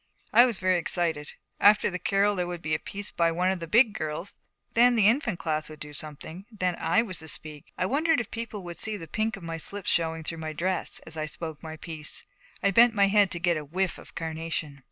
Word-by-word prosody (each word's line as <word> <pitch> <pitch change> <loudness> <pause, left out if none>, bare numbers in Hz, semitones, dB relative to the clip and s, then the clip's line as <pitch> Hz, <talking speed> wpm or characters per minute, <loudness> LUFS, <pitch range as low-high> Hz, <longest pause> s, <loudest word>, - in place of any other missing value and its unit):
I 245 +2 +8
was 235 -5 -1
very 185 -1 +2
excited. 165 -3 -1 0.3
After 210 0 +5
the 180 - -4
carol 200 +2 +2
there 180 -2 -1
would 175 -1 -6
be 155 +1 -1
a - - +1
piece 205 +1 -5
by 170 -1 +2
one 180 +3 +1
of 190 - -2
the 165 - -6
Big 225 +4 +5
Girls; 155 +4 -4 0.4
then 240 +1 +5
the 215 -4 +4
Infant 225 - +3
Class 155 -2 -2
would 155 -1 -11
do 150 0 -8
something; 155 +6 -6
then 185 -5 -1
I 175 +7 +3
was 185 -6 -4
to 160 - -7
speak. 150 -1 -3
I - - +1
wondered 310 - +2
if 235 - -5
people 225 -3 -5
would 175 -1 -8
see 215 -1 -2
the 165 -4 -9
pink 220 +3 -1
of 190 - -12
my 165 0 -4
slip 200 +4 -3
showing 165 -1 +1
through 165 +1 -4
my 155 -1 -4
dress 185 +4 -1
as 160 0 -3
I 155 0 -2
spoke 160 0 -7
my 160 0 -7
piece. 155 -2 -3 0.4
I 200 - +4
bent 230 +3 +6
my 200 -1 +4
head 205 -1 +4
to 175 - -4
get 170 -1 +2
a 155 - -4
whiff 180 +5 -2
of - - -15
carnation. 160 -3 -4
175 Hz, 240 wpm, -27 LUFS, 160-205 Hz, 0.4 s, I